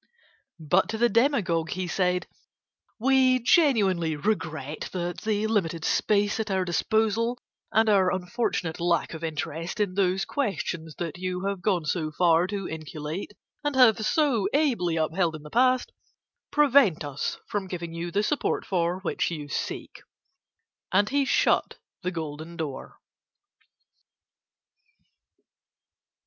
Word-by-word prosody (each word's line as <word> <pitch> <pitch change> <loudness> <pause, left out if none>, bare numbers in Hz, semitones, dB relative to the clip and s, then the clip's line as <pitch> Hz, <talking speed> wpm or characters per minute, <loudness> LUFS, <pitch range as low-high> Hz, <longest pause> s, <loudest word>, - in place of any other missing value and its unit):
But 165 +4 +2
to 220 - -2
the 240 +1 +3
demagogue 210 - +2
he 185 0 -2
said: 180 0 0 0.7
"We 260 +1 +4
genuinely 210 - +3
regret 155 -5 -3
that 175 -1 -3
the 215 -1 0
limited 170 -7 0
space 205 0 +1
at 220 -1 -2
our 190 -1 0
disposal 220 +6 +1 0.3
and 220 +1 +3
our 195 -3 +4
unfortunate 180 -3 -2
lack 170 0 +1
of 160 0 -7
interest 165 +3 -4
in 205 -3 0
those 190 0 +1
Questions 180 - -3
that 170 0 -5
you 185 0 -3
have 200 -2 -2
gone 180 -4 +1
so 155 0 -1
far 170 +1 +3
to 195 -1 -4
inculate 155 +4 -6 0.3
and 290 -1 -1
have 230 -4 +5
so 240 -5 +2
ably 235 - +1
upheld 160 +1 0
in 155 - -10
the 150 - -11
past, 255 +1 +3 0.6
prevent 275 - +4
us 145 -1 -3
from 200 -2 -3
giving 170 -2 -5
you 170 +1 -4
the 200 +4 0
support 285 +7 -1
for 175 0 0
which 190 - -1
you 150 -4 -6
seek." - - -5 0.9
And 205 +3 +3
he 280 0 +2
shut - - +2 0.2
the 180 - -1
golden 160 -1 -6
door. 150 -5 -6
185 Hz, 135 wpm, -26 LUFS, 165-220 Hz, 0.9 s, have